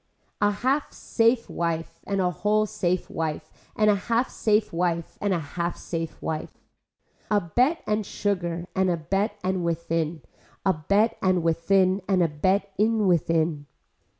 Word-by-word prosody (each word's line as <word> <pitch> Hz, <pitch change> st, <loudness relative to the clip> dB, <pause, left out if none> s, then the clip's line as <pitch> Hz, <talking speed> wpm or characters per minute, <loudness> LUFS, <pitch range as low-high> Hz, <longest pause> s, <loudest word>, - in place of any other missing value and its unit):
A 205 Hz, -, +5 dB
half 260 Hz, +8 st, 0 dB
safe 230 Hz, +1 st, +1 dB
wife 165 Hz, -1 st, -3 dB
and 200 Hz, -1 st, 0 dB
a 180 Hz, -1 st, +2 dB
whole 210 Hz, +5 st, +1 dB
safe 185 Hz, -4 st, -1 dB
wife 155 Hz, -1 st, -4 dB, 0.2 s
and 215 Hz, -, +3 dB
a 210 Hz, -, +6 dB
half 230 Hz, +5 st, 0 dB
safe 210 Hz, -3 st, +1 dB
wife 170 Hz, -1 st, -1 dB
and 205 Hz, -, +1 dB
a 185 Hz, -, +2 dB
half 170 Hz, +3 st, -3 dB
safe 165 Hz, -2 st, -5 dB
wife. 155 Hz, -1 st, -3 dB, 0.8 s
A 210 Hz, -, +4 dB
bet 250 Hz, -, +1 dB
and 215 Hz, 0 st, 0 dB
sugar 175 Hz, -4 st, -2 dB
and 190 Hz, -1 st, +2 dB
a 175 Hz, -, +1 dB
bet 195 Hz, +7 st, -1 dB
and 185 Hz, -1 st, 0 dB
within, 165 Hz, -2 st, -1 dB, 0.4 s
a 190 Hz, -, +4 dB
bet 200 Hz, +8 st, +1 dB
and 185 Hz, -2 st, +2 dB
within 185 Hz, +4 st, +2 dB
and 185 Hz, -3 st, +3 dB
a -, -, +3 dB
bet 190 Hz, +6 st, 0 dB
in 220 Hz, 0 st, +3 dB
within. 165 Hz, -4 st, +1 dB
185 Hz, 155 wpm, -25 LUFS, 165-210 Hz, 0.8 s, a